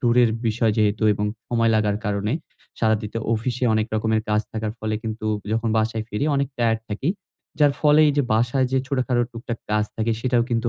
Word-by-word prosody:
টুরের 120 Hz, -2 st, +4 dB, 0.2 s
বিষয় 110 Hz, 0 st, +2 dB
যেহেতু 105 Hz, 0 st, +2 dB
এবং 105 Hz, +1 st, -1 dB, 0.2 s
সময় 115 Hz, -1 st, +2 dB
লাগার 105 Hz, -1 st, +2 dB
কারণে 105 Hz, +2 st, -1 dB, 0.5 s
সারাদিতে 110 Hz, 0 st, 0 dB, 0.2 s
অফিসে 125 Hz, +3 st, -2 dB
অনেক 110 Hz, 0 st, +1 dB
রকমের 110 Hz, 0 st, +1 dB
কাজ 105 Hz, 0 st, +3 dB
থাকার 110 Hz, -1 st, -3 dB
ফলে 110 Hz, 0 st, -2 dB
কিন্তু 110 Hz, -1 st, -4 dB, 0.3 s
যখন 115 Hz, 0 st, 0 dB
বাসায় 110 Hz, 0 st, -1 dB
ফিরি 105 Hz, +7 st, -2 dB
অনেক 140 Hz, -1 st, 0 dB
টায়ার্ড 115 Hz, -1 st, +2 dB
থাকি। 105 Hz, +8 st, -2 dB, 0.5 s
যার 145 Hz, -1 st, +5 dB
ফলে 150 Hz, 0 st, +5 dB
এই 145 Hz, -, +2 dB
যে 145 Hz, -, +4 dB
বাসায় 120 Hz, +4 st, +2 dB
যে 135 Hz, -, +3 dB
ছোটখাটো 130 Hz, -3 st, +1 dB
টুকটাক 115 Hz, 0 st, -5 dB
কাজ 105 Hz, 0 st, +2 dB
থাকে 115 Hz, +1 st, 0 dB
সেটাও 125 Hz, -1 st, +2 dB
কিন্তু 120 Hz, 0 st, +1 dB
115 Hz, 185 wpm, -23 LUFS, 110-120 Hz, 0.5 s, যার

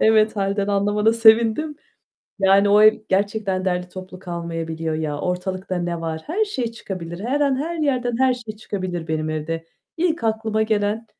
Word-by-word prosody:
Evet 220 Hz, 0 st, +4 dB
hâlden 200 Hz, 0 st, 0 dB
anlamana 205 Hz, +2 st, +2 dB
sevindim, 230 Hz, +6 st, +4 dB, 0.6 s
yani, 195 Hz, +1 st, +5 dB
o 210 Hz, +1 st, +6 dB
ev 215 Hz, 0 st, +8 dB
gerçekten 195 Hz, -1 st, 0 dB
derli 180 Hz, -1 st, -1 dB
toplu 185 Hz, 0 st, -9 dB
kalmayabiliyor 165 Hz, -3 st, -4 dB
ya. 155 Hz, -2 st, -2 dB
Ortalıkta 185 Hz, +1 st, -3 dB
ne 175 Hz, -1 st, -2 dB
var? 160 Hz, -1 st, -4 dB
Her 400 Hz, +8 st, +1 dB
şey 250 Hz, -, -3 dB
çıkabilir. 180 Hz, -6 st, -7 dB
Her 270 Hz, +5 st, 0 dB
an, 280 Hz, -2 st, +2 dB
her 325 Hz, +5 st, -3 dB
yerden, 255 Hz, -6 st, 0 dB
her 260 Hz, -1 st, +4 dB
şey 225 Hz, -3 st, -8 dB
çıkabilir 185 Hz, -6 st, -4 dB
benim 155 Hz, 0 st, -1 dB
evde. 160 Hz, +1 st, -3 dB, 0.3 s
İlk 325 Hz, -6 st, 0 dB
aklıma 220 Hz, -1 st, 0 dB
gelen: 215 Hz, +1 st, 0 dB
205 Hz, 160 wpm, -22 LUFS, 180-225 Hz, 0.6 s, ev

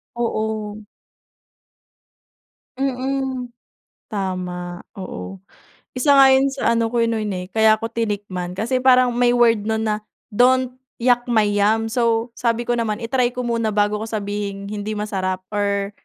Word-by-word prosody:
Oo. 215 Hz, -2 st, -3 dB, 1.9 s
Mm. 265 Hz, -1 st, -2 dB, 0.6 s
Tama, 180 Hz, -4 st, -4 dB, 0.2 s
oo. 95 Hz, -, -7 dB, 0.6 s
Isa 280 Hz, +2 st, +4 dB
nga 270 Hz, -1 st, +8 dB
yun 265 Hz, +1 st, +4 dB
sa 270 Hz, -, +1 dB
ano 230 Hz, -1 st, +2 dB
ko 235 Hz, -, +2 dB
noon 225 Hz, -2 st, -1 dB
eh 180 Hz, 0 st, -4 dB
kaya 220 Hz, 0 st, +5 dB
ko 225 Hz, -, -3 dB
tinikman, 200 Hz, -5 st, -3 dB
kasi 240 Hz, +6 st, 0 dB
parang 255 Hz, -1 st, +5 dB
may 245 Hz, 0 st, +2 dB
word 230 Hz, -3 st, +3 dB
nun 220 Hz, 0 st, 0 dB
na, 215 Hz, -1 st, 0 dB, 0.3 s
don't 255 Hz, +3 st, +3 dB, 0.2 s
yuck 245 Hz, 0 st, +3 dB
my 225 Hz, -3 st, +3 dB
yum. 210 Hz, +2 st, +2 dB
So, 230 Hz, -1 st, +1 dB
sabi 235 Hz, 0 st, 0 dB
ko 240 Hz, 0 st, 0 dB
naman 225 Hz, -1 st, -2 dB
i-try 245 Hz, +1 st, 0 dB
ko 250 Hz, -, -3 dB
muna 230 Hz, -3 st, -1 dB
bago 205 Hz, 0 st, +2 dB
ko 220 Hz, -, -4 dB
sabihing 205 Hz, -2 st, -4 dB
hindi 210 Hz, +1 st, -4 dB
masarap 190 Hz, -3 st, -2 dB
or 200 Hz, -1 st, -1 dB
220 Hz, 140 wpm, -21 LUFS, 205-245 Hz, 1.9 s, nga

